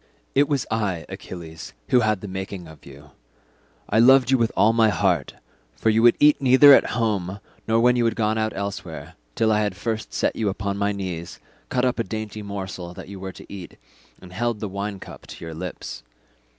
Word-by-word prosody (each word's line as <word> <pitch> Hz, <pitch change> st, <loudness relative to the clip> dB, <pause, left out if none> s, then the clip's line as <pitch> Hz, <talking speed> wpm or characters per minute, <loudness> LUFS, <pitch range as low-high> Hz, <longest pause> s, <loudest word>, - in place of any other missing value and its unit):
"It 140 Hz, +2 st, +3 dB
was 140 Hz, -3 st, 0 dB
I, 100 Hz, -7 st, -1 dB
Achilles, 80 Hz, -2 st, -9 dB, 0.2 s
who 125 Hz, -, +5 dB
had 110 Hz, -4 st, +1 dB
the 105 Hz, -, -6 dB
making 95 Hz, -2 st, -6 dB
of 80 Hz, -2 st, -15 dB
you; 70 Hz, +1 st, -14 dB, 0.8 s
I 110 Hz, -, +2 dB
loved 130 Hz, +1 st, +6 dB
you 130 Hz, -, +5 dB
with 115 Hz, -1 st, +1 dB
all 110 Hz, +2 st, +5 dB
my 115 Hz, -1 st, +4 dB
heart: -, -, 0 dB, 0.4 s
for 110 Hz, -, +1 dB
you 110 Hz, +1 st, +3 dB
would 120 Hz, 0 st, +6 dB
eat 150 Hz, -1 st, +5 dB
neither 135 Hz, +2 st, +8 dB
at -, -, +5 dB
home 100 Hz, -4 st, -1 dB, 0.3 s
nor 115 Hz, 0 st, +3 dB
when 125 Hz, +1 st, +4 dB
you 120 Hz, -1 st, +2 dB
had 115 Hz, -1 st, +1 dB
gone 110 Hz, -1 st, +1 dB
out 110 Hz, 0 st, 0 dB
elsewhere, 100 Hz, 0 st, -6 dB, 0.2 s
till 110 Hz, -1 st, +2 dB
I 105 Hz, -, +3 dB
had 105 Hz, -3 st, -1 dB
first 110 Hz, +2 st, -4 dB
set -, -, 0 dB
you 110 Hz, -2 st, 0 dB
upon 100 Hz, 0 st, -3 dB
my 100 Hz, 0 st, +1 dB
knees, 90 Hz, -4 st, -5 dB, 0.3 s
cut 125 Hz, 0 st, +1 dB
up 125 Hz, -, 0 dB
the 115 Hz, -, 0 dB
dainty 110 Hz, -1 st, -5 dB
morsel 95 Hz, -3 st, -6 dB
that -, -, -10 dB
you 100 Hz, -1 st, -8 dB
were 95 Hz, 0 st, -6 dB
to -, -, -12 dB
eat, 95 Hz, -3 st, -10 dB, 0.4 s
and 90 Hz, -1 st, -13 dB
held 120 Hz, +2 st, -1 dB
the 105 Hz, -, -3 dB
wine 100 Hz, +1 st, -4 dB
cup -, -, -12 dB
to -, -, -9 dB
your 80 Hz, -, -7 dB
lips. 85 Hz, -6 st, -7 dB
105 Hz, 210 wpm, -23 LUFS, 95-115 Hz, 0.8 s, neither